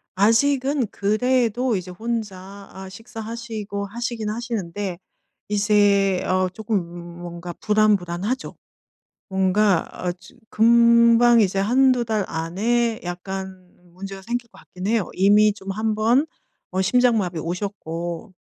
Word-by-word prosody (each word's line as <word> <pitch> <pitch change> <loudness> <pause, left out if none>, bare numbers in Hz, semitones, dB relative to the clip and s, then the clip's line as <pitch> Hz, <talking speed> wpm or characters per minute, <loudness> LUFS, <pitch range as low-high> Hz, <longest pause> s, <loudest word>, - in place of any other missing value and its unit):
아직은 260 +5 +2
그래도 240 +3 +1
이제 185 -1 -5
혼자 200 -2 -6
아 190 0 -9
식사하시고 220 -1 -6
하시긴 230 +1 -4
하시는데 205 -5 -4 0.5
이제 205 -2 +3
어 185 0 +1
쪼끔 175 -4 -5
뭔가 175 0 -7
불안불안하죠. 210 +1 0 0.7
뭔가 190 0 +2
어 180 - -3
좀 175 +7 -16
금방 235 +1 +5
이제 195 -1 +1
1~2 250 +4 +3
달 220 -3 -1
안에 220 +8 -1
약간 185 +1 -6 0.2
문제가 195 +1 -8
생길 240 +3 -4
것 - - -18
같긴 185 +1 -8
해요. 220 -3 0
이미 205 +2 +4
좀 195 -1 -7
1 215 +2 -1
번 235 +7 +3 0.5
어 190 - +1
심장마비 210 -5 +2
오셨고. 175 0 -5
205 Hz, 230 characters per minute, -22 LUFS, 185-230 Hz, 0.7 s, 금방